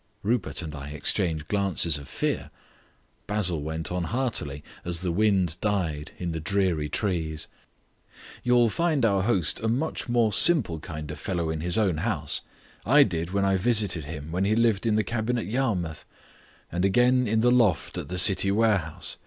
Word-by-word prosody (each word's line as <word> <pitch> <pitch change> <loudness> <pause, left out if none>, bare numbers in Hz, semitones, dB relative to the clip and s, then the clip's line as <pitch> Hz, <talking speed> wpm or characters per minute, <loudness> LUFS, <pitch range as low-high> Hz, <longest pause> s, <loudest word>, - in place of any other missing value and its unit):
Rupert 110 -4 -1
and 80 -2 -7
I 70 -1 -7
exchanged 80 +1 -1
glances 95 -6 +2
of 70 - -12
fear. - - -2 0.8
Basil 95 -7 0
went 80 +3 -3
on 90 -1 -2
heartily, 95 - -2 0.2
as 85 -1 -2
the 90 -2 -1
wind 95 -3 +1
died 85 -8 -2
in 90 -2 -4
the 80 - -4
dreary 85 -3 0
trees. 80 -7 -2 1.0
"You'll 120 -1 +4
find 160 -5 +1
our 100 -3 +2
host 95 -8 +1
a 110 - -2
much 125 +3 -1
more 120 -3 +2
simple 100 - +5
kind 75 -3 -7
of - - -8
fellow 85 -5 -2
in 80 -1 -4
his 90 +1 +2
own 95 -7 +1
house. 80 -6 -1 0.4
I 145 +6 +6
did 85 -6 -3
when 100 +1 0
I 95 -1 +2
visited 100 - +1
him 75 0 -7
when 90 +3 -1
he 105 +2 +2
lived 115 -2 +1
in 110 - +2
the 110 - +2
cabin 120 +2 -2
at 115 - -3
Yarmouth, 100 - -2 0.7
and 90 +1 -2
again 125 +5 +3
in 110 +1 +1
the 120 +1 +4
loft 115 -10 +2
at - - -4
the 90 +3 -4
city 95 +2 +4
warehouse. 100 -7 0
95 Hz, 180 wpm, -26 LUFS, 80-110 Hz, 1.0 s, I